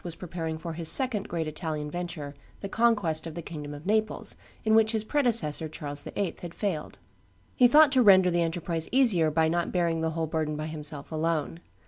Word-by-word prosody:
was 170 -2 -5
preparing 165 -2 -5
for 165 +1 -6
his 165 0 +1
second 250 -7 +4
great 165 -2 -2
Italian 155 -1 -4
venture, 170 -5 -5 0.3
the 200 - -4
conquest 195 -8 +1
of 160 - -8
the 170 - -5
kingdom 150 -3 -7
of 145 +2 -10
Naples, 215 +2 0 0.3
in 220 - +3
which 220 0 +4
his 220 -1 +1
predecessor 220 - +1
Charles 145 -1 -6
VIII. 200 -4 -4
had 175 -1 -8
failed. 185 -8 -4 0.6
He 250 - +6
thought 300 +3 +6
to 260 -2 +4
render 190 -4 +6
the 175 0 +1
enterprise 165 0 -2
easier 220 -12 +3
by 160 +1 +2
not 170 +1 -1
bearing 170 -2 0
the 160 - 0
whole 165 - 0
burden 155 -1 -2
by 155 +1 -4
himself 150 -2 -6
alone. 160 0 -2
170 Hz, 195 wpm, -27 LUFS, 155-205 Hz, 0.6 s, He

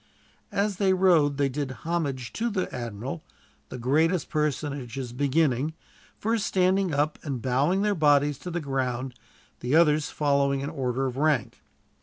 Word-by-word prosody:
As 200 -1 0
they 190 -2 +3
rowed 170 -7 +3
they 140 -1 +2
did 140 +1 -3 0.2
homage 145 -7 -2
to 235 +1 -1
the 195 -4 -2
admiral, 120 +6 -5 0.5
the - - -6
greatest 155 +7 +1
personages 140 -4 -2
beginning, 145 +1 +1 0.4
first 220 0 0
standing 185 0 +2
up 150 +1 0
and 140 -5 -4
bowing 140 - +1
their 210 0 +2
bodies 145 -4 +3
to 180 - -7
the 175 0 -2
ground, 130 -2 -2 0.5
the 125 +4 0
others 155 -2 +4
following 140 -2 +1
in 140 +2 -4
order 135 -3 -1
of 130 -1 -3
rank. 145 -5 0
145 Hz, 150 wpm, -26 LUFS, 130-170 Hz, 0.5 s, others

